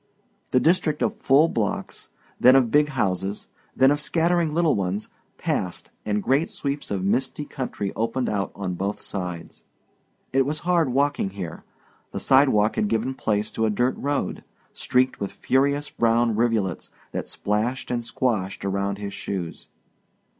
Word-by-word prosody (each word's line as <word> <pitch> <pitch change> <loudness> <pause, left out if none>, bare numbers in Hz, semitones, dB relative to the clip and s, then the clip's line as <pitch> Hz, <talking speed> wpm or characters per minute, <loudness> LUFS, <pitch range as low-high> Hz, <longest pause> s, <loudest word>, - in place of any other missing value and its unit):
The 130 - +4
district 160 -1 +2
of - - +1
full 140 +4 +4
blocks, 110 -9 -3 0.3
then 130 +1 +7
of 125 -4 +4
big 150 0 +4
houses, 100 -6 -2 0.3
then 135 +1 +5
of 145 0 0
scattering 170 +1 +1
little 165 0 +3
ones, 100 +1 -2 0.3
passed 90 -1 -2 0.2
and 105 -1 0
great 140 +6 +2
sweeps 140 0 -4
of 95 -2 -2
misty 130 +7 0
country 125 -9 -4
opened 115 +3 -1
out 100 -2 -1
on 95 -2 -3
both 100 +3 -3
sides. 90 -4 -6 0.7
It 135 0 +4
was 150 +4 -2
hard 170 -4 +2
walking 140 -4 +1
here. 95 -4 -7 0.5
The - - -2
sidewalk 130 -6 +4
had 105 - +2
given 115 +5 0
place 105 -4 -1
to 110 0 0
a - - +1
dirt 120 +5 +1
road, 145 0 -2 0.3
streaked 130 +1 +1
with 100 - -3
furious 140 +2 +1
brown 115 -1 +2
rivulets 110 -5 0 0.2
that - - -4
splashed 110 +7 -2
and 120 -1 -1
squashed 105 -6 -1
around 100 0 -1
his 100 -1 -5
shoes. 90 -4 -5
120 Hz, 155 wpm, -24 LUFS, 100-140 Hz, 0.7 s, then